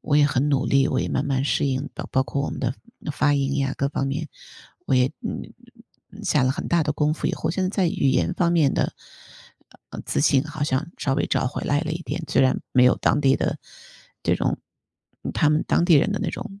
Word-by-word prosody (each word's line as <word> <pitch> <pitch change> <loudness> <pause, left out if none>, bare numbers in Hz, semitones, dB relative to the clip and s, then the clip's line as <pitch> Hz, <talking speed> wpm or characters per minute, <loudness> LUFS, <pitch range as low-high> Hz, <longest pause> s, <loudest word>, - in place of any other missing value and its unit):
我 145 - +1
也 150 - +6
很 140 0 +1
努 140 -2 +1
力， 135 +1 +3
我 130 - 0
也 - - -2
慢 135 - -1
慢 135 -2 0
适 140 - +1
应 135 +1 -2
到， - - -6
包 130 - +2
括 140 +1 -3
我 - - -2
们 - - -6
的 125 0 -1 0.4
发 145 0 +2
音 140 0 0
呀 135 -1 0
各 140 - 0
方 135 -1 -2
面， 150 +4 -3 0.6
我 - - +2
也， 125 0 +4
嗯 230 - -6 0.6
嗯， 210 +2 -11
下 155 -8 +2
了 130 - +2
很 130 - -4
大 170 -1 +2
的 150 - -1
功 150 +1 +1
夫。 - - -3
以 - - 0
后 160 - -2
现 185 +3 -2
在 185 - +1
在 190 -1 +1
语 140 - 0
言 130 +6 +2
方 170 -1 +1
面 155 -5 +3
的， - - -1 1.0
呃， - - -7
自 - - 0
信 140 -3 +4
好 155 -1 -6
像 145 +3 -1
稍 135 - -1
微 - - 0
找 - - 0
回 125 - -4
来 145 0 +1
了 160 -1 -3
一 165 - -4
点。 170 - -4
虽 145 - +2
然 130 -1 +3
没 125 -1 +5
有 125 - +5
当 145 - +2
地 135 -2 +4
的， - - -2 0.6
这 - - +2
种 - - -1 0.8
他 150 - +3
们 150 +1 +2
当 170 - +3
地 175 - +5
人 150 +7 +4
的 205 - -1
那 - - -1
种 195 0 -8
145 Hz, 265 characters per minute, -23 LUFS, 135-160 Hz, 1.0 s, 也